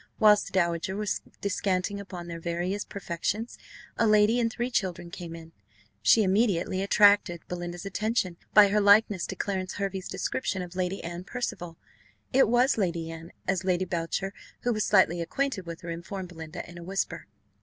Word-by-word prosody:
Whilst 210 -2 +5
the - - -9
dowager 170 0 0
was 210 0 -2 0.2
descanting 200 0 -1
upon 185 -3 -7
their 170 -1 -6
various 175 +4 -2
perfections, 200 +4 -4 0.4
a 230 - +4
lady 215 +2 +5
and 230 -1 +1
three 240 +2 -3
children 175 -6 -2
came 170 -1 -7
in; 165 0 -11 0.5
she 160 - +5
immediately 190 -2 +1
attracted 200 -3 +4
Belinda's 175 0 -5
attention, 200 -2 -1
by 205 -1 +8
her 210 +1 +2
likeness 205 -2 +5
to - - -5
Clarence 190 -2 -2
Hervey's 195 -2 -3
description 195 -7 -2
of 180 0 -10
Lady 185 +1 -2
Anne 170 +1 -5
Percival 175 -9 -4 0.6
it 265 -2 +5
was 245 +2 +3
Lady 170 -4 -1
Anne, 165 +1 -9 0.2
as 190 -1 0
Lady 185 0 +1
Boucher, 185 +2 -2 0.3
who 245 - +1
was 215 -1 0
slightly 175 -4 +4
acquainted 200 +1 -2
with 170 0 -7
her, 170 -1 -5
informed 170 +3 -6
Belinda 160 0 -8
in 175 0 -10
a - - -9
whisper. 180 -2 -3
185 Hz, 170 wpm, -28 LUFS, 170-205 Hz, 0.6 s, by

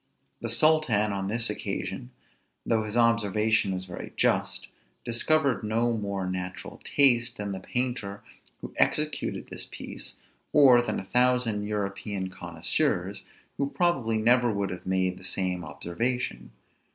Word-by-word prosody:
The - - -3
sultan 130 -10 +3
on 95 -1 -2
this 115 +3 +2
occasion, - - -4 0.6
though 110 -1 +2
his 110 +2 -3
observation 110 -3 +2
was 95 0 -3
very 90 -2 -8
just, - - +1 0.4
discovered 135 +2 +2
no 115 +2 +1
more 100 -3 -3
natural 90 0 -5
taste 120 -4 +3
than 105 -1 -3
the 95 - -4
painter 120 -3 -3 0.4
who - - -8
executed 150 0 0
this - - -5
piece, - - -7 0.4
or 130 -5 +7
than 110 -3 -2
a 95 - -8
thousand 125 -3 +2
European 100 -2 -3
connoisseurs, 85 -3 -1 0.4
who 140 0 0
probably 135 -11 +1
never 120 +2 +4
would 100 -2 -2
have 90 - -7
made 95 -1 0
the - - -14
same 90 -1 -1
observation. 85 - -3
110 Hz, 135 wpm, -27 LUFS, 95-125 Hz, 0.6 s, or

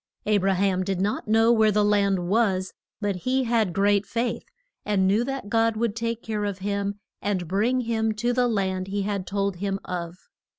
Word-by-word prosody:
A 210 -1 +3
bra 195 0 +1
ham 185 0 +1
did 190 -1 -2
not 205 +3 -1
know 225 +2 +4
where 220 -2 +4
the 210 0 +2
land 200 -3 +2
was, 190 -3 +1 0.3
but 200 -2 -1
he 260 +7 0
had 230 -5 +1
great 200 +2 +2
faith, 235 +3 -2 0.4
and 200 -2 +1
knew 205 +5 +3
that 270 -3 -4
God 225 0 +2
would 225 -2 0
take 230 0 -3
care 215 -2 -2
of 200 -2 -2
him 200 +1 -2 0.3
and 190 -4 -1
bring 220 +8 +1
him 225 -2 0
to 240 +3 -1
the 250 0 +2
land 190 -4 -1
he 200 +1 -2
had 200 -2 -3
told 200 -1 -1
him 195 +1 -2
of. 175 -1 -5
205 Hz, 200 wpm, -25 LUFS, 195-225 Hz, 0.4 s, know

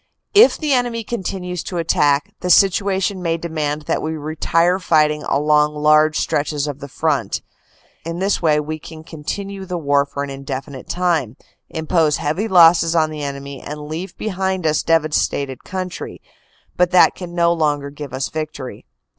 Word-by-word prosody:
If 435 +4 +7
the 300 -3 0
enemy 240 -2 0
continues 185 -5 -4
to 180 - -4
attack, 150 -3 +1
the 180 - -3
situation 195 +1 +3
may 165 -1 0
demand 155 -3 -3
that - - -1
we 160 +1 -3
retire 165 +4 +1
fighting 150 -4 +2
along 150 +1 +2
large 155 +1 +4
stretches 145 0 -1
of 145 -2 -5
the 140 - -7
front. 145 +1 -1 0.6
In 165 +1 -5
this 195 +2 0
way, 155 -3 +3
we 155 +1 -4
can 155 +1 -11
continue 195 +5 -6
the 180 -1 -4
war 145 -2 +2
for 140 0 -4
an 140 - -5
indefinite 135 0 -7
time, 165 -9 0 0.3
im 160 -1 -5
pose 155 -3 +2
heavy 155 +9 -1
losses 170 -3 +6
on 155 -1 +2
the 155 -1 -6
enemy, 140 -1 -6
and 150 +1 -7
leave 165 +5 -6
behind 190 -3 -2
us 155 -1 +2
devastated 150 -4 0
country, 185 -1 -6 0.6
but 180 0 +3
that 180 - +5
can 175 -2 -8
no 170 0 +3
longer 145 -3 -1
give 145 -2 -8
us 130 +1 -2
victory. 155 -5 -6
160 Hz, 165 wpm, -19 LUFS, 150-180 Hz, 0.6 s, If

